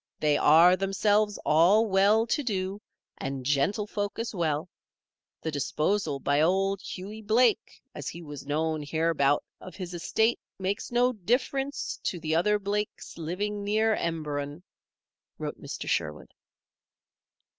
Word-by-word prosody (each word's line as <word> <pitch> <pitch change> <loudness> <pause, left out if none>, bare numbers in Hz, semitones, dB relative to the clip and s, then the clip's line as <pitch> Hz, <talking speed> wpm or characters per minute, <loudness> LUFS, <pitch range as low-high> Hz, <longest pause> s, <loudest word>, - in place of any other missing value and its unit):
They 150 -1 +3
are, 165 +5 +6
themselves, 205 +2 +1
all 180 +9 +5
well 205 +2 +4
to 235 - 0
do, 195 -3 -2 0.4
and 135 -1 -4
gentlefolk 205 +8 0
as 230 0 -3
well. 160 -4 -1 0.8
The 160 - -2
disposal 150 +2 -1
by 145 +2 +1
Old 195 +3 +2
Hughie 205 +4 -7
Blake, 220 +2 +2
as 145 - -7
he 170 +1 -9
was 145 -3 -9
known 155 +1 0
hereabout, 150 -1 +1 0.2
of 185 - -11
his 180 -2 -6
estate 220 +7 +1 0.2
makes 195 +4 -3
no 245 +1 +3
difference 265 +6 -1
to 175 - -1
the 160 0 -2
other 210 +6 +3
Blakes 205 +1 -3
living 200 +6 -3
near 215 +2 +2
Emberon," 150 -1 -3 0.7
wrote - - -6
Mr. - - -6
Sherwood. - - -2
185 Hz, 130 wpm, -28 LUFS, 155-210 Hz, 0.8 s, are